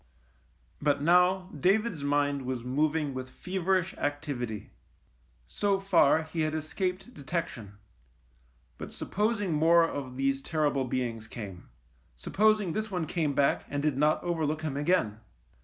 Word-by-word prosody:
But 145 -1 +1
now 180 +3 +4
David's 190 - +1
mind 145 0 +1
was 130 -2 -3
moving 150 +3 0
with 130 0 -5
feverish 185 +4 -1
activity. 140 -7 -3 0.8
So 200 - 0
far 170 -5 +4
he 160 +1 -4
had 155 0 0
escaped 185 +7 -3
detection 135 - -5 0.5
— - - -36
but - - -7
supposing 205 -3 -1
more 165 +2 +5
of 130 -5 -6
these 135 0 0
ter 155 0 0
rible 135 -3 -1
beings 115 -4 -2
came. 100 -6 -8 0.5
Supposing 210 - +2
this 215 0 -2
one 180 -4 -2
came 155 -3 -1
back 140 - +2
and 145 0 -2
did 150 -3 +1
not 150 +3 +2
overlook 155 -3 -1
him 150 -3 -2
again. 145 - +1
155 Hz, 140 wpm, -29 LUFS, 135-180 Hz, 0.8 s, more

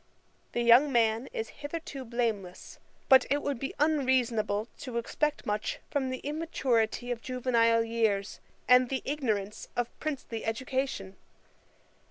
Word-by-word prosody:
The 240 - 0
young 245 +5 +6
man 230 0 +2
is 220 0 -4
hitherto 290 -2 -5
blameless; 225 -6 -3 0.3
but 265 -1 +7
it 285 +2 +1
would 280 -4 -2
be 270 - -4
unreasonable 250 -8 +1
to 250 -3 -5
expect 300 +6 -1
much 210 0 -2
from 270 -3 0
the 255 - -3
immaturity 260 -6 0
of 235 -1 -3
juvenile 235 -3 +2
years, 220 -3 0 0.3
and 250 0 +6
the 265 -1 -2
ignorance 220 -8 -2
of 245 -1 -2
princely 270 -7 -4
education. 225 -4 -3
245 Hz, 130 wpm, -29 LUFS, 225-270 Hz, 0.3 s, but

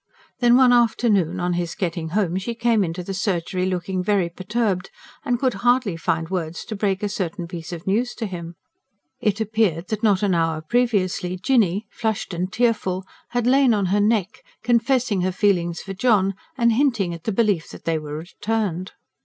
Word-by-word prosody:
Then 240 -1 +5
one 255 -2 +6
afternoon, 220 -7 +2
on 175 0 0
his 175 -1 -2
getting 170 -4 -3
home, 185 -1 0
she 235 +5 -4
came 230 -2 +2
into 175 +1 -4
the 195 - -5
surgery 185 -2 -1
looking 185 0 -2
very 195 -3 +1
perturbed, 190 +1 -2 0.3
and 245 -3 0
could 255 0 +1
hardly 245 -6 +2
find 165 -1 -1
words 170 -3 -3
to 220 - -3
break 195 -1 -1
a - - +2
certain 185 -3 -3
piece 170 0 -7
of 170 -1 -7
news 230 +6 0
to 230 - -3
him. 170 -3 -6 0.6
It 210 0 0
appeared 215 -6 0
that 215 -1 -2
not 210 -3 +3
an 200 -2 +2
hour 165 -2 +1
previously, 185 -3 0
Jinny, 205 -2 +2
flushed 220 -4 -2
and 180 +2 -2
tearful, 190 -5 0 0.2
had 245 -1 -1
lain 260 -2 +4
on 200 -2 0
her 205 - +3
neck, 210 -2 +1 0.2
confessing 240 -3 +2
her 185 +1 +1
feelings 180 -3 +1
for 195 - -6
John 195 -2 +2 0.2
and 235 -2 +4
hinting 230 -9 +1
at 170 -1 -10
the 220 - 0
belief 205 -6 +1
that - - -12
they 165 -1 +1
were 150 -1 -6
returned. 190 +1 -3
195 Hz, 185 wpm, -22 LUFS, 175-225 Hz, 0.6 s, one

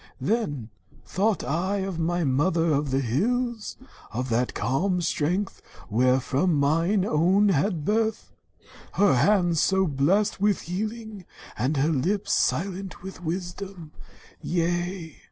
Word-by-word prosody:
"Then 145 - -2 0.3
thought 200 -1 0
I 175 +10 -1
of 190 -4 -4
my 175 +1 0
mother 165 +4 +2
of 145 0 0
the 135 +1 +1
hills, 225 - -1 0.3
Of 125 +3 -3
that 120 +2 0
calm 165 - 0
strength 175 +4 -1 0.3
wheref 125 +4 +2
rom 170 +5 +3
mine 165 +7 +2
own 190 +5 +3
had 170 -2 0
birth, 220 +2 -1 0.6
Her 200 -4 +4
hands 175 +1 +3
so 190 0 +3
blest 175 +8 +1
with 205 -2 +2
healing, 215 +2 -5 0.3
and 130 +7 -1
her 140 +4 +2
lips 185 +9 0
Silent 190 +1 -1
with 190 -1 -9
wisdom. 175 0 -5 0.5
Yea 175 -1 -2
175 Hz, 125 wpm, -25 LUFS, 145-200 Hz, 0.6 s, Her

